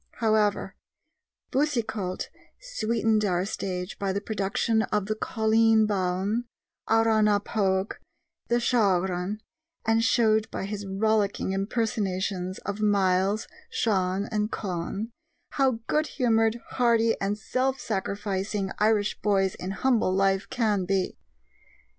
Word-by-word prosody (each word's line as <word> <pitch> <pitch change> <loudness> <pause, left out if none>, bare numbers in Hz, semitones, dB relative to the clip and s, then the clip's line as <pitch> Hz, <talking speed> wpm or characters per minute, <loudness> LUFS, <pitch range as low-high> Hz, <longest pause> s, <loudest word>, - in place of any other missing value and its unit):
However, 215 -4 +1 0.8
Boucicault 225 -9 -1 0.3
sweetened 225 - 0
our 180 -2 +1
stage 185 -3 -4
by 195 -1 0
the 195 - -1
production 220 +2 0
of 210 -2 -1
The 215 - -1
Colleen 220 0 +3
Bawn, 200 +3 0 0.4
Arrah 225 -1 +4
na 210 -1 +4
Pogue, 195 -2 0
and - - -39 0.5
The - - +1
Shaughraun, 195 -4 +1 0.4
and 225 0 +3
showed 220 -3 +3
by - - -4
his 200 0 -5
rollicking 205 0 0
impersonations 195 -3 -1
of 200 +2 -3
Myles, 200 0 +2 0.2
Shan, 190 -2 0
and 210 0 -1
Conn, 195 +4 -4 0.4
how 260 -5 +1
good 305 +4 +1
humored, 225 -3 +1
hearty, 230 -2 +3
and 200 +1 0
self 260 +4 -1
sacrificing 200 -1 -2
Irish 210 -1 +2
boys 195 -2 +2
in 185 - -6
humble 215 -1 +1
life 195 0 +1
can 215 -5 +1
be. 190 0 0
210 Hz, 115 wpm, -26 LUFS, 195-225 Hz, 0.8 s, Arrah